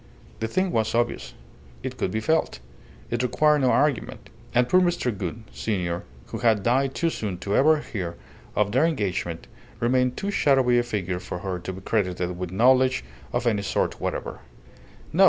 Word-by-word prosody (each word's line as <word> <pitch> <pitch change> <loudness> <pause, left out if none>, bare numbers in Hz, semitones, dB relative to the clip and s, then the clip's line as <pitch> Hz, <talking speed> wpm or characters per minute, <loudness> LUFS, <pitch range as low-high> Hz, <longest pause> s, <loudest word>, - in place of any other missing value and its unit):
The 110 - -1
thing 185 +9 0
was 110 0 0
obvious. 120 0 -1 0.5
It - - -4
could - - -1
be 110 +4 -2
felt. 160 - +1 0.5
It 120 0 0
required 150 +4 +3
no 130 -2 +3
argument. 145 -3 0 0.2
And 125 0 +3
poor 185 +6 +5
Mr. 175 - +1
Gould, 100 +4 -5
senior, 90 -5 -2 0.2
who - - -6
had 110 -4 +3
died 130 +4 +2
too 165 -1 +1
soon 100 - -3
to 100 +3 -2
ever 155 +3 +5
hear 90 -10 -5 0.4
of 105 -1 +2
their 130 +6 +3
engagement, 90 - -2 0.3
remained 125 +1 +2
too 200 - -2
shadowy 130 -8 +4
a - - +1
figure 95 -6 -2
for 90 - -6
her 95 -2 -2
to 90 - -5
be 95 - -9
credited 90 -4 -1
with 90 -1 -5
knowledge 130 - +4 0.3
of 120 0 -1
any 110 -4 +2
sort 100 - -1
whatever. - - -3
115 Hz, 175 wpm, -25 LUFS, 95-130 Hz, 0.5 s, poor